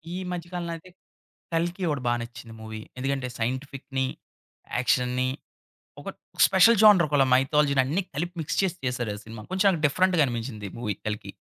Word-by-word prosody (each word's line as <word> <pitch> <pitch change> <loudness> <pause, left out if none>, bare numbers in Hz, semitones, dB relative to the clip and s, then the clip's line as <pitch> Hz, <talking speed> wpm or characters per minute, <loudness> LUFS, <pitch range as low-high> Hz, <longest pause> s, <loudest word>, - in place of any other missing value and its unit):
ఈ - - -3
మధ్య 175 -1 -5
కాలంలో 170 -1 -3
నంటే 180 +3 -13 0.6
కల్కి 175 +3 -1
ఒకటి 145 -3 -1
బా 120 - +3
నచ్చింది 115 -1 -9
మూవీ. 110 0 -7 0.2
ఎందుకంటే 135 0 -2
సైంటిఫిక్‌ని, 130 +2 -2 0.7
యాక్షన్‌ని 125 0 +1 0.7
ఒక - - -9 0.4
స్పెషల్ 195 +5 +6
జోనర్ 205 -6 +7
ఒక 145 - +1 0.2
మైథాలజీ‌ని 140 +1 +3
అన్ని 160 +9 0
కలిపి 175 +5 -3
మిక్స్ 155 - -3
చేసి 180 -2 -1
చేశారు 125 -4 -2
ఆ - - -10
సినిమా 110 -1 -9
కొంచెం 190 -3 +3
డిఫరెంట్‌గా 180 +2 +3
అనిపించింది 115 -3 -4
మూవీ 110 -4 -2
కల్కి. 105 -1 -4
140 Hz, 150 wpm, -26 LUFS, 120-175 Hz, 0.7 s, జోనర్